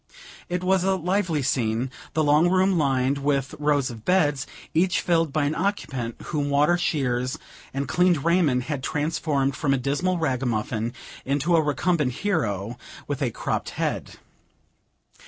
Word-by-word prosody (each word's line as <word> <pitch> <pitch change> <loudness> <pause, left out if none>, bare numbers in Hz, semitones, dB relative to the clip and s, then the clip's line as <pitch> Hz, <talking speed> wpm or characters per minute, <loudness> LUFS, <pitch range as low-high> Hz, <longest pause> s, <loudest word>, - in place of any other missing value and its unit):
It 180 0 -2
was 190 0 +2
a 190 0 +2
lively 180 -4 0
scene; 125 -1 0 0.2
the 155 - +3
long 150 +4 +4
room 185 +1 +3
lined 135 -3 +1
with 140 -1 0
rows 145 -3 +1
of 110 -2 -10
beds, 150 -6 +2 0.3
each 180 +3 +2
filled 165 -3 +1
by 155 +1 +1
an 145 - 0
occupant, 140 - -2
whom 145 -3 -2
water, 145 +4 +4
shears, 130 -7 -1 0.3
and 140 0 -3
clean 180 +3 +3
raiment, 150 -4 +2
had 145 0 -3
transformed 145 -1 0
from 135 0 +1
a - - 0
dismal 145 +8 0
ragamuffin 120 -6 -1 0.3
into 145 +5 +1
a 165 - +5
recumbent 150 -1 +1
hero, 120 - -2 0.3
with 145 0 -3
a 130 - +1
cropped - - -3
head. - - -2
145 Hz, 150 wpm, -25 LUFS, 130-170 Hz, 0.3 s, a